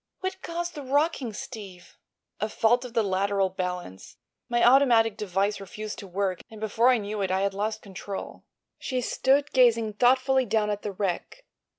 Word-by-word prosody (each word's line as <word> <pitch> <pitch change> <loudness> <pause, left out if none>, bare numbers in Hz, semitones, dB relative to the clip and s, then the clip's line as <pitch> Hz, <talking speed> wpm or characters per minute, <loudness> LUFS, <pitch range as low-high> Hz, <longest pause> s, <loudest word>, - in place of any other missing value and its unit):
What 375 0 -4
caused 345 +1 -4
the 295 - -7
rocking, 280 -2 0
Steve?" 200 -5 -9 0.4
"A 215 - -1
fault 240 +3 +2
of 245 -2 -9
the 225 - +3
lateral 195 0 +1
balance. 180 - -5 0.3
My 240 0 +4
automatic 240 -5 +5
device 200 0 -1
refused 210 +2 -7
to 200 - -9
work, 185 0 -2
and 220 - -11
before 220 +3 +2
I 255 - +5
knew 210 -1 -4
it 190 - 0
I 190 +1 +1
had 200 0 0
lost 215 +2 -3
control." 195 0 -7 0.4
She 255 -2 -2
stood 275 +3 +1
gazing 230 -4 +4
thoughtfully 260 +3 +3
down 210 0 +1
at 205 0 -3
the 205 - -4
wreck. 195 - -4
215 Hz, 175 wpm, -26 LUFS, 195-250 Hz, 0.4 s, automatic